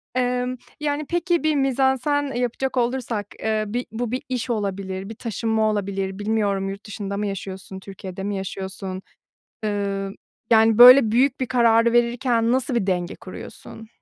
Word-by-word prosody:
Emm, 250 0 0 0.2
yani 295 0 -1
peki 345 -1 0
bir 310 -1 +2
mizansen, 270 +1 +1
eee, 245 - -1
yapacak 255 +2 -2
olursak, 235 -4 -1
eee, 220 -1 0
bir 245 +4 -3
bu 230 +1 -3
bir 255 - -2
iş 250 -1 -2
olabilir, 195 -2 -3
bir 225 - -7
taşınma 220 -1 0
olabilir. 195 -1 -3
Bilmiyorum 205 -2 0
yurt 195 +1 -8
dışında 200 -1 -5
mı 210 0 -1
yaşıyorsun, 190 -1 -6
Türkiye'de 190 -1 -8
mi 205 +1 -2
yaşıyorsun? 190 0 -5 0.6
Iıı, 200 -1 -2 0.4
yani 225 0 +5
böyle 250 -1 +10
büyük 260 +2 +2
bir 260 - 0
kararı 235 -2 +4
verirken 240 0 +2
nasıl 260 0 0
bir 235 -5 0
denge 180 -2 -1
kuruyorsun? 225 -1 -10
225 Hz, 155 wpm, -23 LUFS, 195-250 Hz, 0.6 s, böyle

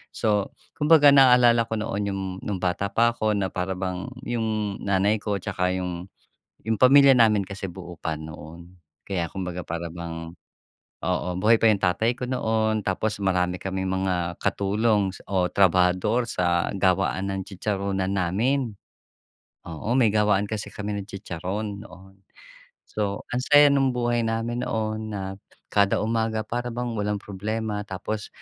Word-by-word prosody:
So 105 -2 0 0.2
kumbaga, 150 -1 +7
naalala 125 -4 +6
ko 115 - -2
noon 105 -2 -2
yung 95 0 -3 0.2
no'ng 100 -3 -3
bata 95 +2 0
pa 115 +2 +2
ako, 110 -2 0
na 95 -2 -2
para 95 0 -2
bang 90 +1 -4 0.2
yung 110 -4 -2
nanay 100 +2 +1
ko, 105 -2 -1
'tsaka 90 -2 -1
yung 90 -1 -4 0.6
yung 110 0 -1
pamilya 140 +2 +7
namin 110 -5 +4
kasi 100 0 -6
buo 90 -2 -10
pa 80 - -2
noon. 80 +3 -11 0.3
Kaya, 90 -4 -2
kumbaga 90 -2 -5
para 85 0 -4
bang, 80 -1 -6 0.7
oo, 90 +1 -1
buhay 110 +4 +5
pa 115 - +3
yung 105 - +2
tatay 100 +5 +2
ko 125 - -3
noon. 110 -3 0
Tapos 105 +3 -1
marami 90 -1 +1
kaming 95 0 -3
mga 90 -2 -1
katulong 105 0 +1 0.2
o 95 -2 +1
trabahador 95 +5 +2
sa 85 -1 +1
gawaan 95 0 +1
ng 95 - -3
chicharunan 95 -1 -2
namin. 110 +7 0 0.9
Oo, 85 +7 -4
may 115 -5 +4
gawaan 105 -2 +3
kasi 105 0 -4
kami 105 -1 -5
ng 100 - -10
chicharon, 100 +2 -5
noon. 95 0 -15 0.7
So, 100 -2 -3
ang 125 - 0
saya 145 +1 +7
nung 135 -1 +3
buhay 120 -1 +1
namin 115 +1 -2
noon. 110 0 -2
Na 95 -2 -4 0.4
kada 100 -1 +3
umaga, 110 -1 -1
para 120 +2 -3
bang 120 0 -3
walang 105 -1 -1
problema. 105 +2 -4
Tapos, 105 +2 -5
100 Hz, 150 wpm, -25 LUFS, 95-110 Hz, 0.9 s, kumbaga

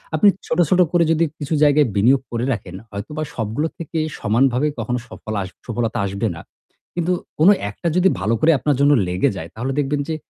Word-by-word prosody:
আপনি 210 - +4 0.2
ছোট, 160 - -1
ছোট 185 - +3
করে 175 -1 +4
যদি 165 +1 +2 0.2
কিছু 150 +2 -3
জায়গায় 145 -2 +5
বিনিয়োগ 125 +7 +4
করে 120 +1 -1
রাখেন 95 -4 -7 0.2
হয়তোবা 135 +10 -5
সবগুলো 115 +8 -1
থেকে 165 0 -5 0.2
সমানভাবে 125 +5 +2
কখনো 125 +2 -2
সফল 110 - -7
আস 95 - -5 0.2
সফলতা 115 -1 -2
আসবে 100 0 -2
না। - - -9 0.5
কিন্তু 175 +1 0 0.3
কোন 165 +5 +7 0.2
একটা 105 +11 -5
যদি 185 +1 +5
ভালো 110 +3 0
করে 165 - +5
আপনার 145 -2 +1
জন্য 145 +1 +5 0.2
লেগে 90 +1 +1
যায় 80 -1 -7
তাহলে 125 +4 -3
দেখবেন 145 +1 0
যে 160 - -1
135 Hz, 190 wpm, -20 LUFS, 110-155 Hz, 0.5 s, কোন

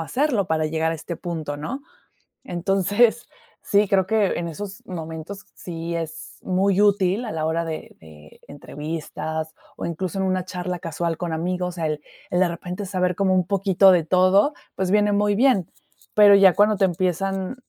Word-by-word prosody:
hacerlo 245 - 0
para 155 -1 0
llegar 160 +1 0
a - - -3
este 165 +2 -6
punto, 160 -5 -5
¿no? 255 - -5 0.6
Entonces, 205 +4 +1 0.3
sí, 205 0 +2
creo 190 -2 +2
que 210 0 +1
en 170 -1 -3
esos 200 +4 -8
momentos 165 +3 -7
sí 170 -1 -5
es 160 -1 -6
muy 190 +1 +2
útil, 200 +1 +2
a 220 - -5
la 155 -1 -2
hora 165 +1 0
de 160 -1 -6
de 75 -1 -16
entrevistas 155 +2 -5 0.2
o - - -4
incluso 180 +3 -3
en 190 - +1
una 185 -1 0
charla 180 -1 -4
casual 165 +1 -3
con 175 -1 -4
amigos, 180 +2 -2
el 155 -3 -2 0.3
el, 180 - +1
de 185 - +4
repente, 180 +3 -6
saber 180 -1 0
como 190 0 +2
un 185 -1 +1
poquito 195 -1 +4
de 175 -3 +3
todo, 185 - +3 0.2
pues 185 -1 -1
viene 210 0 +3
muy 205 0 +2
bien, 230 -8 +3 0.4
pero 205 -1 +7
ya 195 -2 +7
cuando 210 +1 +4
te 195 - +1
empiezan 190 +3 -1
180 Hz, 175 wpm, -23 LUFS, 165-200 Hz, 0.6 s, pero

